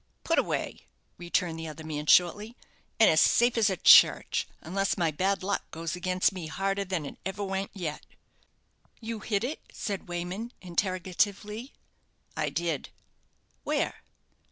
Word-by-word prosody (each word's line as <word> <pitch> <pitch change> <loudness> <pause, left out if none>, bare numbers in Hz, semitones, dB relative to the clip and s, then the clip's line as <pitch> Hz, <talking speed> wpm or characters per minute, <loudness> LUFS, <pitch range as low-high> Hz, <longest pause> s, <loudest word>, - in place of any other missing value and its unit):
"Put - - +2
away," - - -3 0.3
returned 175 -1 -1
the 165 - -5
other 155 +1 -8
man, 150 -1 -5
shortly; 205 +8 +3 0.4
"and 220 - +7
as 155 - +5
safe 240 +1 +4
as 220 -3 +3
a 190 - -2
church, - - +6
unless 195 +5 -1
my 170 -3 +1
bad 190 +5 0
luck 200 +1 -2
goes 165 +2 -4
against 185 +1 +1
me 180 -4 -6
harder 195 +4 -1
than 185 -5 -3
it - - -9
ever 195 +2 -4
went 195 0 -2
yet." 165 -6 -4 1.0
"You 225 -1 -5
hid 210 -1 -1
it?" 275 +6 -3
said 200 -5 -5
Wayman, 180 +7 -4
interrogatively. 195 +6 -2 0.6
"I - - -1
did." 165 -5 -2 0.7
"Where?" - - -1
185 Hz, 145 wpm, -28 LUFS, 170-205 Hz, 1.0 s, and